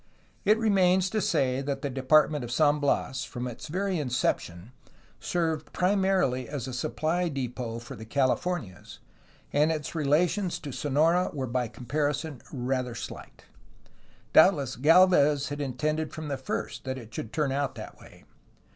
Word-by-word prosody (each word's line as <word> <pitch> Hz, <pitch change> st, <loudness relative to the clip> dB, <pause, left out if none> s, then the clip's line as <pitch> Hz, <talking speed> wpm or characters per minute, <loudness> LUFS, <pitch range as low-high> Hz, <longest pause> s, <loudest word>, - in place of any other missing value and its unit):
It 210 Hz, +2 st, +5 dB
remains 190 Hz, -4 st, +3 dB
to 215 Hz, -, 0 dB
say 135 Hz, -7 st, +1 dB
that 140 Hz, 0 st, -3 dB
the 140 Hz, -, -1 dB
Department 145 Hz, +2 st, +3 dB
of 120 Hz, -, -6 dB
San 150 Hz, +2 st, +3 dB
Bias, 135 Hz, -1 st, 0 dB
from 125 Hz, -3 st, -5 dB
its 120 Hz, -2 st, -8 dB
very 185 Hz, +2 st, -1 dB
inception, 120 Hz, -, -2 dB, 0.5 s
served 160 Hz, -3 st, -2 dB
primarily 185 Hz, -, +1 dB
as 140 Hz, -4 st, -4 dB
a 130 Hz, -, -5 dB
supply 165 Hz, +7 st, -1 dB
depot 125 Hz, -4 st, -4 dB
for 120 Hz, +3 st, -9 dB
the 110 Hz, -, -9 dB
CaHfornias, 130 Hz, -, -1 dB, 0.6 s
and 150 Hz, +2 st, +3 dB
its 155 Hz, -2 st, -3 dB
relations 170 Hz, +5 st, +1 dB
to 145 Hz, -, -7 dB
Sonora 160 Hz, +7 st, +2 dB
were 135 Hz, -3 st, -3 dB
by 125 Hz, 0 st, -1 dB
comparison 145 Hz, +3 st, -3 dB
rather 125 Hz, -2 st, -2 dB
slight; -, -, -9 dB, 0.9 s
doubtless 155 Hz, -6 st, +5 dB
Galvez 150 Hz, -2 st, +5 dB
had 145 Hz, 0 st, -4 dB
in 135 Hz, -3 st, -3 dB
tended 155 Hz, +3 st, -1 dB
from 155 Hz, -1 st, -6 dB
the 140 Hz, -, -2 dB
first 120 Hz, -3 st, -4 dB
that 130 Hz, 0 st, -3 dB
it 115 Hz, -3 st, -11 dB
should 115 Hz, -, -5 dB
turn 150 Hz, -4 st, 0 dB
out 135 Hz, -1 st, -1 dB
that 110 Hz, -, -9 dB
way. -, -, -16 dB
145 Hz, 155 wpm, -28 LUFS, 130-160 Hz, 0.9 s, It